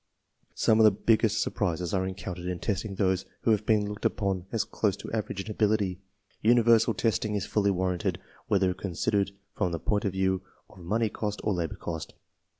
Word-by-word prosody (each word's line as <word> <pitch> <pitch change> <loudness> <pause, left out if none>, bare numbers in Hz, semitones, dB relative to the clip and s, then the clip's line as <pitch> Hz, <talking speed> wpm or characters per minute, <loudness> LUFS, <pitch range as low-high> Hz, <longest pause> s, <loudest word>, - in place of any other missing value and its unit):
Some 110 0 +3
of - - +7
the 110 - +9
biggest 110 +2 +2
surprises 90 -2 -2
are 95 -1 +1
encountered 90 -2 -6
in 90 -1 -2
testing 100 +1 -2
those 95 -1 +1 0.2
who 115 - +2
have 105 -1 +1
been 105 -2 +3
looked 105 0 -7
upon 95 -3 0
as 115 - +1
close 105 -3 -1
to - - -8
average 105 -3 -2
in 110 - -5
ability. 105 -4 +1 0.4
Universal 115 -1 +5
testing 105 -1 0
is 100 - -1
fully 100 -1 +1
warranted, 90 -2 0 0.3
whether 95 -2 +2
considered 100 +2 0 0.3
from 90 -4 0
the 85 - -1
point 105 +4 0
of 100 - 0
view 95 -1 +1 0.3
of - - -16
money 105 +6 0
cost 105 0 -3
or 105 - +1
labor 85 -3 -2
cost. 80 -3 -6
100 Hz, 185 wpm, -28 LUFS, 95-110 Hz, 0.4 s, the